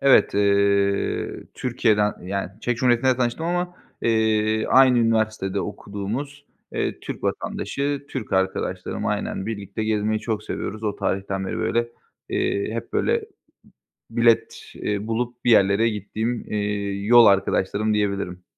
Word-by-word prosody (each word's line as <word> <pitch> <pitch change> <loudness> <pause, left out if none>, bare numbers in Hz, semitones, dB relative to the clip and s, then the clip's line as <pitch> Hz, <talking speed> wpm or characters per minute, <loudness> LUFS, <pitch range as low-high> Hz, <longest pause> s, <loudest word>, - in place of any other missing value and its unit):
Evet, 135 -6 +5
eee, 100 0 +1
Türkiye'den, 110 -4 +1
yani, 95 +1 -3
Çek 120 0 -1
Cumhuriyeti'nde 125 +1 +3
tanıştım 125 +6 -1
ama, 175 +1 -1 0.3
eee, 110 -1 +2
aynı 130 -2 +6
üniversitede 110 -4 +1
okuduğumuz, 125 +9 -5 0.3
eee, - - -2
Türk - - -7
vatandaşı, 140 0 -2
Türk 125 -6 -5
arkadaşlarım, 95 0 -1
aynen 95 - -2
birlikte 105 -1 -4
gezmeyi 110 0 0
çok 110 -1 -2
seviyoruz. 110 +2 -5
O 105 - -1
tarihten 95 0 -2
beri, - - -3
böyle, 120 0 0 0.4
eee, 100 +2 -1
hep 115 - -5
böyle, - - +1 0.9
bilet, 115 -1 +1
eee, 105 0 -3
bulup 120 +2 -3
bir 120 - +5
yerlere 100 +2 +5
gittiğim, 110 +3 -3
eee, 105 -1 -1
yol 120 +1 +8
arkadaşlarım 100 +1 +2
diyebilirim. 100 -4 -1
110 Hz, 125 wpm, -23 LUFS, 100-120 Hz, 0.9 s, yol